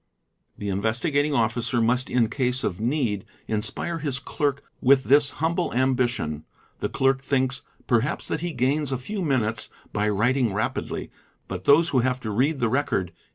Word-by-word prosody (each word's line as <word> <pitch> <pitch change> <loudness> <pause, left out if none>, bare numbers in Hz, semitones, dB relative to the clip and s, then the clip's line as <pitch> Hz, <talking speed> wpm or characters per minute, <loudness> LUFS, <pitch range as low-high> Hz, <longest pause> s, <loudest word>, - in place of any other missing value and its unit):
The 100 - -4
Investigating 130 - 0
Officer 120 +1 +1
must 120 +3 +2
in 120 -3 +3
case 125 +1 -1
of 90 - -2
need 120 -5 0 0.2
inspire 110 +10 -2
his 140 -4 -1
cler 145 +2 -1
k 140 - -22 0.2
with 130 +1 +5
this 140 +1 +5
humble 165 +5 -1
ambition; 125 - 0 0.4
the - - -1
clerk 135 0 +2
thinks 130 -1 0 0.2
perhaps 120 +4 0
that - - -2
he 175 0 -2
gains 140 +2 0
¢ 130 - 0
few 200 - -5
minutes 115 -9 0 0.2
by 105 0 +1
writing 115 +1 +1
rapidly; 110 - -3 0.4
but 95 0 -6
those 160 +4 +6
who 130 - +2
have 125 +1 +1
to 110 - -3
read 135 +7 +1
the 120 - +2
record. 105 - 0
130 Hz, 165 wpm, -25 LUFS, 110-140 Hz, 0.4 s, those